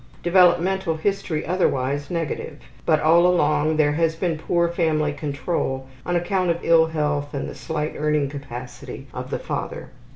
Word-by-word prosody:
Developmental 180 0 +3
history 190 -3 -1
otherwise 145 -6 0
negative, 165 -4 -3 0.3
but 155 - +4
all 170 +3 +5
along 155 -3 +2
there 150 -1 +4
has 165 +1 +1
been 170 -1 -1
poor 170 +1 +1
family 160 -4 0
control 140 -2 -2 0.2
on 175 - 0
account 180 +1 0
of 170 - +2
ill 165 -1 +5
health 150 -2 -2
and 140 - -3
the - - -7
slight 155 -1 -3
earning 150 -1 +1
capacity 130 -3 -8
of - - -6
the - - -1
father. - - -5
160 Hz, 155 wpm, -23 LUFS, 145-175 Hz, 0.3 s, all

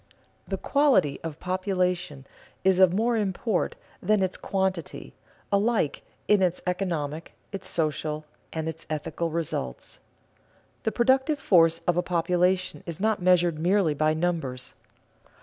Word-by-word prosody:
_ - - -35 0.5
The - - -1
quality 255 - +2
of 160 -2 -6
population 180 -6 -1 0.4
is 190 -1 +4
of 185 -2 +7
more 230 +5 +1
import 205 -1 -1 0.3
than 210 -2 +2
its 185 - -1
quantity, 190 -3 -3 0.4
alike 200 -6 +1 0.3
in 210 -2 +4
its 180 -1 +1
economic, 165 -4 -3 0.2
its 195 -2 -6
social, 155 -1 -2 0.3
and 160 0 -3
its 160 0 -6
ethical 155 +2 -2
results. 155 - -4 0.9
The 220 - +2
productive 265 +6 +2
force 165 -10 +4
of 175 -1 +2
a - - +4
population 180 +1 +1
is 165 -2 -5
not 215 -1 +1
measured 175 -3 +3
merely 180 -1 +2
by 155 +1 +1
numbers. 155 -7 -2
180 Hz, 130 wpm, -26 LUFS, 160-195 Hz, 0.9 s, of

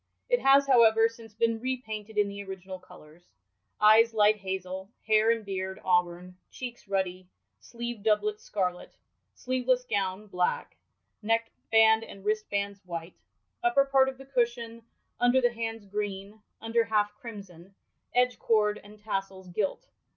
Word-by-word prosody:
* - - -51
It - - +5
has, 275 +1 +5
however, 225 -4 +5
since 230 -2 -13
been 230 0 +1
repainted 220 -4 -5
in 205 -1 +3
the 200 0 -6
original 190 -1 -8
colours: 175 -3 -16 0.6
eyes 225 +2 +6
light 210 0 +5
hazel, 190 -1 -5 0.2
hair 215 0 +4
and 230 -2 +1
beard 190 -1 -4
auburn, 180 0 0
cheeks 245 -4 -8
ruddy, 185 -2 -2 0.3
sleevd 235 -2 -6
doublet 415 - +1
scarlet, 185 - -3 0.4
sleeveless 255 0 0
gown 200 -2 -2
black, 180 -3 -2 0.5
neckband 225 0 +3
and 195 -3 -12
wristbands 200 -2 -2
white; 170 -1 -6 0.5
upper 360 -6 +3
part 270 -1 +4
of 265 - -9
the 270 - -12
cushion, 235 -3 -1 0.4
under 245 +2 +4
the 245 -2 +2
bands, 225 -2 -4
green; 205 +1 -5 0.2
under 230 +1 +1
half, 210 -2 +1
crimson; 195 -5 -11 0.4
edge 250 0 +2
cord 210 -2 +2
and 210 +1 -14
tassels, 195 -3 -4
gilt. 200 - -2
215 Hz, 140 wpm, -28 LUFS, 195-235 Hz, 0.6 s, eyes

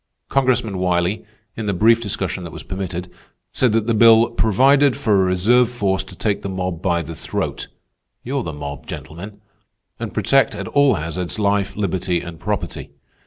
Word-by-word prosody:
Congressman 125 -7 +1
Wiley, 90 +2 0 0.3
in 110 -2 -4
the 100 - 0
brief 115 +5 +4
discussion 95 -3 -3
that 85 - -7
was 80 - -9
permitted, 95 -2 -5 0.5
said 125 -3 +2
that 110 -1 +1
the 115 - +1
bill 115 +1 +6
'provided 130 +4 +3
for 110 - +1
a - - +2
reserve 110 +7 +3
force 100 -6 -1
to - - -12
take 105 -2 -1
the 100 - -5
mob 90 -3 -3
by 85 -2 0
the 80 +2 -7
throat'—you're 135 - -6
the 85 - -4
mob, 70 -1 -7
gentlemen—'and 100 +4 -10
protect 115 +3 +2
at 100 -2 -5
all 140 -2 +4
hazards 85 +4 -4
life, 100 -1 0
liberty, 95 -3 -1
and 85 -2 -9
property. - - -4
100 Hz, 165 wpm, -20 LUFS, 90-115 Hz, 0.5 s, bill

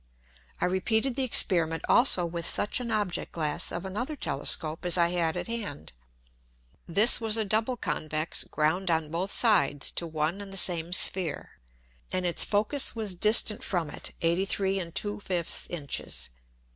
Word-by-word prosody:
I - - 0
repeated 220 +7 0
the 270 - -2
Experiment 170 -10 +2
also 240 -8 +3
with 170 0 -4
such 205 - 0
an 245 -2 -6
Object 210 -5 -2
glass 150 -3 -2
of 175 +2 -6
another 240 +11 -5
Telescope 155 - +1
as 180 0 +3
I 170 -1 +2
had 170 -2 -1
at - - -4
hand. 215 - -6 0.9
This 210 +8 +5
was 220 -1 +1
a 220 - -1
double 220 +5 -1
Convex 155 -5 -2
ground 165 +5 -1
on 160 -2 -1
both 180 +4 -3
sides 175 - +2
to 170 - -5
one 160 +4 -2
and 200 -1 -10
the 195 - -5
same 175 -2 +3
Sphere, 180 -3 +2 0.6
and 185 - -1
its 175 - +2
Focus 220 +8 +1
was 215 -4 -3
distant 210 +3 +3
from 170 -5 -3
it - - -4
83 190 +3 0
2/5 180 0 -2
Inches. 145 - -3
180 Hz, 155 wpm, -27 LUFS, 165-210 Hz, 0.9 s, This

